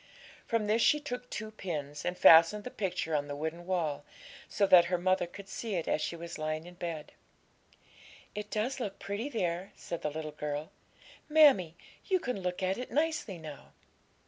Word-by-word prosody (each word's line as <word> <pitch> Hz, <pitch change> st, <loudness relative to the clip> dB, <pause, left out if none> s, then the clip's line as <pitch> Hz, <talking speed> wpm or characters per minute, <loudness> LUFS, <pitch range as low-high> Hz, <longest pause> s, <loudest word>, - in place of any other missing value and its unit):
From 230 Hz, -3 st, +1 dB
this 215 Hz, +2 st, +2 dB
she 300 Hz, -, +5 dB
took 250 Hz, -4 st, -6 dB
two 215 Hz, 0 st, -5 dB
pins, 150 Hz, -8 st, -5 dB
and 180 Hz, 0 st, -2 dB
fastened 165 Hz, +6 st, +7 dB
the 250 Hz, -, -6 dB
picture 180 Hz, -5 st, -2 dB
on 145 Hz, -1 st, 0 dB
the 145 Hz, -, -4 dB
wooden 160 Hz, +4 st, -5 dB
wall, 160 Hz, -6 st, -1 dB, 0.5 s
so 200 Hz, -, +2 dB
that 180 Hz, -3 st, +7 dB
her 180 Hz, +1 st, 0 dB
mother 185 Hz, 0 st, +1 dB
could 195 Hz, +3 st, -11 dB
see 215 Hz, +1 st, -4 dB
it 170 Hz, -, -2 dB
as -, -, +1 dB
she -, -, -2 dB
was 170 Hz, 0 st, -7 dB
lying 155 Hz, +1 st, -2 dB
in 175 Hz, -, -11 dB
bed. 170 Hz, -3 st, -5 dB, 1.2 s
'It 210 Hz, 0 st, -5 dB
does 235 Hz, +6 st, -1 dB
look 205 Hz, -5 st, -4 dB
pretty 200 Hz, +7 st, -4 dB
there,' 185 Hz, -4 st, -2 dB
said 170 Hz, -, -6 dB
the 150 Hz, -, -1 dB
little 155 Hz, 0 st, -5 dB
girl; 150 Hz, 0 st, -4 dB, 0.6 s
'mammie, 275 Hz, -, +6 dB, 0.3 s
you 375 Hz, -2 st, +3 dB
can 250 Hz, -, -3 dB
look 180 Hz, +1 st, -3 dB
at 190 Hz, +4 st, 0 dB
it 250 Hz, -, -5 dB
nicely 300 Hz, -, -1 dB
now.' 155 Hz, -3 st, -10 dB
180 Hz, 185 wpm, -31 LUFS, 160-215 Hz, 1.2 s, fastened